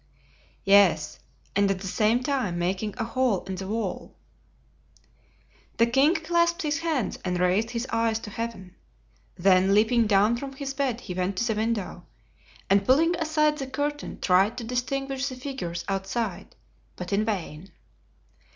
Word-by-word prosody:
"Yes, 195 -6 +4 0.4
and 200 0 +3
at 190 -1 -1
the - - -6
same 220 +6 +1
time 250 -10 -1
making 190 +4 -2
a - - -1
hole 235 -4 0
in 190 - -6
the 190 +1 -5
wall." 225 +3 -4 1.6
The 230 - +5
king 270 +8 +3
clasped 340 +2 +1
his 300 +1 0
hands 320 -8 -1
and 180 -1 -1
raised 185 +5 +2
his 235 0 -3
eyes 230 -1 +1
to 210 - -8
Heaven; 200 -5 -6 0.6
then 190 +1 +4
leaping 225 +2 +3
down 210 +3 +3
from 275 +2 -6
his 270 0 -5
bed 265 -4 -1
he 190 - -6
went 185 +1 -2
to - - +1
the 225 - +1
window, 215 -5 -3 0.6
and 200 +1 +3
pulling 320 - +3
aside 305 -2 +1
the 270 - -4
curtain 290 +2 -4
tried 195 +5 +3
to 245 - -4
distinguish 270 +3 -2
the 255 - -7
figures 255 -10 -5
outside, 195 0 -3 0.4
but 180 +1 -5
in 205 +2 +2
vain. 190 -5 -4
225 Hz, 155 wpm, -26 LUFS, 195-270 Hz, 1.6 s, The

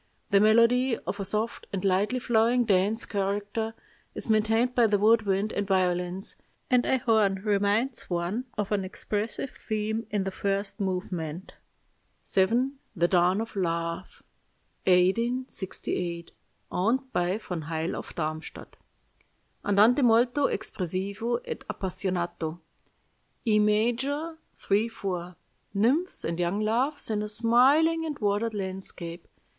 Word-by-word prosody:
The 200 - +6
melody, 230 +3 +4
of 190 +4 -5
a - - -1
soft 215 +4 -3
and 195 0 -3
lightly 195 +6 +2
flowing 240 0 +2
dance 205 +2 +2
character, 205 +3 -2 0.4
is 225 - -1
maintained 225 +3 +2
by 240 -2 +4
the 205 -1 +2
wood 220 +1 +4
wind 195 +2 +1
and 200 -1 -2
violins, 180 -1 0 0.3
and 250 -1 +5
a 265 - +3
horn 220 -5 +2
reminds 210 +4 +1
one 180 +8 -2
of 205 -1 -2
an 200 -2 +1
expressive 210 +6 -3
theme 220 +1 -3
in 205 -2 0
the 195 - -3
first 195 +1 -2
movement. 180 -3 -3 0.7
"VII. 235 +8 +2 0.2
THE 175 -1 +3
DAWN 180 +3 +3
OF 225 -1 -7
LOVE 170 -1 -3 0.6
(1868; 185 -3 0 0.4
owned 255 +8 0
by 180 +3 +1
von 180 -6 -5
Heyl 160 +1 -2
of - - -8
Darmstadt) 155 -1 -5 0.9
"Andante 210 +7 +4
molto 245 +3 +4
espressivo 200 +6 -3
ed - - -6
appassionato, 180 -5 -3 0.9
E 215 -2 +4
major, 250 +10 +1 0.2
3 205 +3 +1
4. 180 -5 -5 0.4
Nymphs 265 - +1
and 165 +1 -2
young 175 +3 0
loves 235 +6 0
in 210 -1 0
a 210 - -3
smiling 260 +9 +4
and 305 -3 -4
watered 210 +2 0
landscape. 185 -3 -5
210 Hz, 125 wpm, -27 LUFS, 185-230 Hz, 0.9 s, The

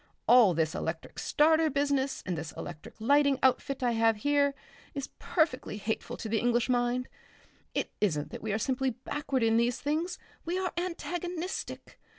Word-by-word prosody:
All 235 -8 +7
this 160 -1 +1
electric - - -4
starter 315 +1 +4
business 280 -1 0
and 180 - -1
this 160 0 -5
electric 155 -3 -8
lighting 280 +4 +4
outfit 265 +1 +2
I 245 - +3
have 225 -1 +3
here, 285 +4 +2 0.4
is 275 -1 -4
perfectly 305 - 0
hateful 215 +2 -3
to - - -5
the 220 0 +1
English 240 +1 +1
mind.... 245 0 +1 0.7
It - - -1
isn't 155 -8 0
that - - -7
we 220 - -2
are 205 - +1
simply 260 +3 0
backward 260 +1 -2
in 225 0 +4
these 235 +1 +2
things, 320 +5 -1 0.3
we 345 +2 -2
are 375 -1 -1
antagonistic. 350 0 -4
255 Hz, 160 wpm, -30 LUFS, 225-295 Hz, 0.7 s, All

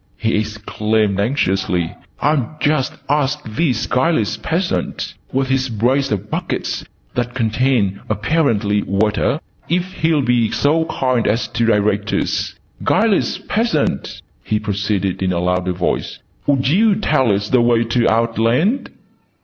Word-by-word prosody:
he 115 - 0
exclaimed 105 -1 0
anxiously. 95 - 0 0.3
"I'll 150 -1 0
just 145 -3 +1
ask 145 0 +1
this 120 +1 0
guileless 125 -6 +1
peasant, 170 - -2 0.2
with 135 0 0
his 135 -1 +1
brace 125 +5 +1
of 105 -1 -2
buckets - - -3 0.3
that 120 0 -2
contain 115 -4 +1
(apparently) 110 - +1
water, 105 +9 +1 0.3
if 180 +2 0
he'll 160 -3 +1
be 120 -3 +2
so 160 +3 +2
kind 130 -6 0
as 115 +3 +1
to 115 0 0
direct 105 -1 +1
us. - - -1 0.3
Guileless 215 -3 +2
peasant!" 210 - -1 0.2
he 105 - 0
proceeded 100 -2 -1
in 95 -1 +1
a 90 - -1
louder 90 +1 0
voice. 90 0 -2 0.3
"Would 135 -2 +2
you 200 +8 +4
tell 150 - +2
us 100 +1 0
the 125 -2 +4
way 120 -1 +3
to 115 +1 +2
Outland?" 115 - +1
115 Hz, 135 wpm, -19 LUFS, 105-145 Hz, 0.3 s, you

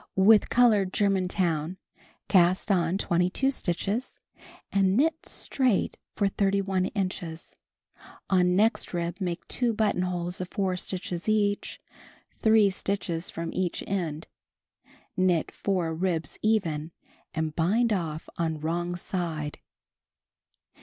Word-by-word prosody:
With 205 +3 +6
colored 215 -6 +4
Germantown 185 -4 0 0.5
cast 185 +2 +3
on 175 -1 +2
22 180 +9 +1
stitches 205 +2 -2 0.5
and 195 0 +3
knit 320 +4 +1
straight 255 -7 0 0.2
for 200 - +2
31 195 -1 +1
inches; 185 -5 -4 0.7
on 180 -1 +3
next 215 -1 +2
rib 170 +1 -2
make 175 -3 -3
2 240 -2 +1
buttonholes 180 -4 -1
of 185 - -5
4 190 -3 -1
stitches 180 0 -4
each, 205 -1 0 0.6
3 220 -2 +5
stitches 185 -3 -3
from 165 0 -5
each 185 -2 -1
end; 165 -5 -3 0.9
knit 185 -4 +2
4 180 -5 -1
ribs 165 -3 -2
even 165 -9 0 0.5
and 160 -1 -2
bind 215 +8 +2
off 160 -5 -3
on 160 -2 -1
wrong 175 +3 -2
side. 165 -4 -4
185 Hz, 110 wpm, -27 LUFS, 170-200 Hz, 0.9 s, With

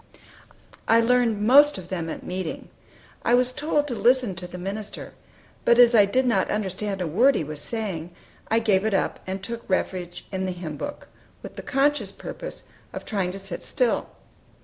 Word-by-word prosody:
I 225 +1 +6
learned 230 -3 +2
most 285 +5 +6
of 180 -1 -9
them 170 -3 -3
at - - -6
meeting. 180 -2 -5 0.5
I 240 - +4
was 250 0 +2
told 295 +1 0
to 260 - -3
listen 245 -2 +3
to 180 0 -7
the 180 - -9
minister; 200 +3 -6 0.5
but 235 - +4
as 245 -1 +7
I 210 -3 +7
did 255 +6 +1
not 240 - +2
understand 200 -1 -2
a - - 0
word 240 - +4
he - - 0
was 150 0 -6
saying, 190 -7 -3 0.4
I 225 - +2
gave 205 -4 +2
it 220 -2 +1
up, - - 0
and 190 0 -4
took 235 +3 -5
refuge 180 -2 -2
in 190 -1 -2
the 185 - -2
hymn 170 -4 -6
book, 290 - -6 0.4
with - - -9
the - - -6
conscientious 290 +2 +1
purpose - - -8 0.3
of - - -6
trying 195 -5 -1
to - - -6
sit 195 -3 -7
still. 250 -4 0
210 Hz, 190 wpm, -25 LUFS, 185-245 Hz, 0.5 s, as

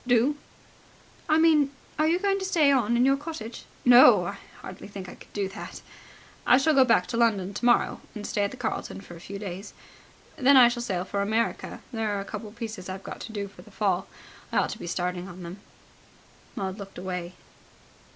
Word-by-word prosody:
"Do?" 245 +4 +3 0.9
"I 310 - +5
mean, 315 -3 +5 0.3
are 310 - +4
you 335 +2 +3
going 395 +1 +1
to - - -4
stay 320 -7 +4
on 235 -3 +2
in 245 - +4
your 270 +1 +5
cottage?" 275 -6 -7 0.2
"No, 245 +1 +8
I - - -5 0.2
hardly - - -9
think 200 -2 -8
I - - -9
could - - -16
do 200 -2 -2
that. 195 - -9 0.6
I 250 - +6
shall 310 +4 +3
go 270 -2 +7
back 230 -8 +3
to 230 - -4
London 205 -5 +2
tomorrow, 240 +3 +2
and 210 -1 -6
stay 205 - -1
at 200 - +1
the 255 - -10
Carlton 235 -4 -4
for 175 - -11
a - - -11
few 200 +3 -7
days. 195 0 -7 0.6
Then 275 -1 +6
I 245 -2 +9
shall 240 0 -3
sail 185 -6 -2
for 200 +1 -2
America. 220 +3 -1
There 220 -3 -1
are - - -2
a 195 - -5
couple 215 +1 -6
of 210 - -17
pieces 220 -6 -6
I've 190 +1 -6
got - - -7
to - - -7
do 205 -2 -4
for 195 - -15
the 215 - -16
Fall. 195 -3 0 0.4
I - - 0
ought - - +2
to - - -7
be - - -7
starting 180 +1 -2
on 180 -1 -10
them." 175 +3 -8 1.0
Maud 190 +1 -4
looked 195 -1 -9
away. 180 -1 -5
215 Hz, 215 wpm, -27 LUFS, 195-255 Hz, 1.0 s, I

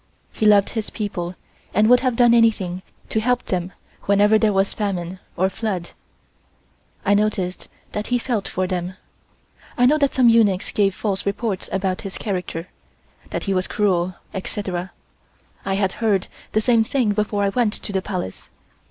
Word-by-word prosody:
He 215 - +1
loved 205 -1 +5
his 220 -2 -3
people 185 -4 -4 0.4
and 210 +2 +5
would 250 +1 +7
have 255 -2 0
done 240 -1 +5
anything 205 -6 +2 0.3
to 220 - +1
help 250 +3 +1
them 180 0 -2 0.3
whenever 205 +2 +4
there 215 -1 +3
was 195 0 +1
famine 185 -3 -3 0.2
or 185 +2 +3
flood. 190 -3 -3 1.1
I 205 - +4
noticed 200 -3 0 0.2
that 210 0 -4
he 245 - +2
felt 235 -4 -2
for 185 - -1
them. 180 0 -3 0.8
I 245 - +5
know 300 +4 +4
that 280 -2 +1
some 255 -2 +5
eunuchs 215 -5 +4
gave 195 -2 +2
false 195 -3 -2
reports 200 -1 -2
about 190 -1 -1
his 195 -2 -6
character, 180 -4 -4 0.6
that - - -3
he 195 - 0
was 185 0 0
cruel, 185 -3 +1 0.2
etc. 190 -2 -4 0.7
I 195 - 0
had 195 -1 +1
heard 210 -4 +1 0.3
the 215 - +3
same 230 0 +4
thing 235 -2 +1
before 210 -1 0
I 200 - +2
went 220 0 +1
to 205 - -5
the 190 - +1
Palace. 185 - -5
200 Hz, 170 wpm, -22 LUFS, 185-220 Hz, 1.1 s, would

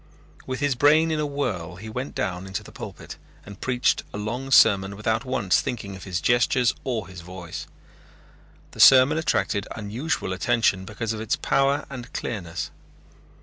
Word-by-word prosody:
With 130 +1 -4
his 145 -1 +2
brain 150 +5 +4
in 155 - 0
a 150 - 0
whirl 100 - -3
he 105 +5 -9
went 125 +5 -5
down 95 -1 -3
into 95 - -4
the - - -13
pulpit - - -9 0.3
and 100 0 -11
preached 125 -1 +1
a - - -6
long 120 +6 -4
sermon 100 -6 +5
without 110 +4 -1
once 105 -8 +1
thinking 105 -5 -5
of 95 - -10
his 90 -2 -2
gestures 120 +5 +3
or 120 -4 -2
his 90 -2 -10
voice. 90 -1 -8 1.0
The - - -14
sermon 135 +4 +7
attracted 100 -8 0
unusual 110 +1 -3
attention 95 +1 +1
because 110 +3 -4
of 110 - -5
its 110 - 0
power 140 +1 +1
and 125 -3 -8
clearness. 85 -7 -4
110 Hz, 165 wpm, -24 LUFS, 95-130 Hz, 1.0 s, sermon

